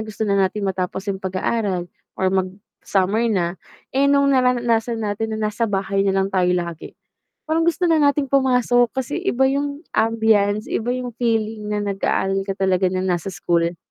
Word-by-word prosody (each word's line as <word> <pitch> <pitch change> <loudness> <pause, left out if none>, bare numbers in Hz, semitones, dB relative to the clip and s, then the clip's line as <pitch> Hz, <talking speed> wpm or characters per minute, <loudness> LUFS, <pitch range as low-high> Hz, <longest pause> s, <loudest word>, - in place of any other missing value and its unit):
gusto 215 0 -4
na 200 - 0
natin 200 +2 0
matapos 190 0 -2
yung 190 - -7
pag-aaral 190 0 -1 0.3
or 190 - 0
mag-summer 195 +3 -1
na, 180 -3 -1 0.3
eh, 275 +1 +3
nung 280 0 +4
nararanasan 240 -3 +2
natin 220 +2 -2
na 215 -1 -1
nasa 230 +1 -1
bahay 195 0 -1
nalang 195 0 +1
tayo 185 -1 +2
lagi, 170 -2 -5 0.5
parang 325 +1 +1
gusto 340 +1 +1
na 330 - +4
nating 285 -2 +2
pumasok 250 -3 +3
kasi 265 +3 -3
iba 265 -9 +1
yung 285 +3 -2
ambiance 220 -2 +2
iba 240 +2 -1
yung 250 -2 -4
feeling 220 -3 -1
na 210 - 0
nag-aaral 195 -1 -1
ka 195 - -3
talaga 185 -1 +2
nang 185 0 -1
nasa 180 +1 -1
school. 170 0 0
215 Hz, 165 wpm, -21 LUFS, 190-245 Hz, 0.5 s, nung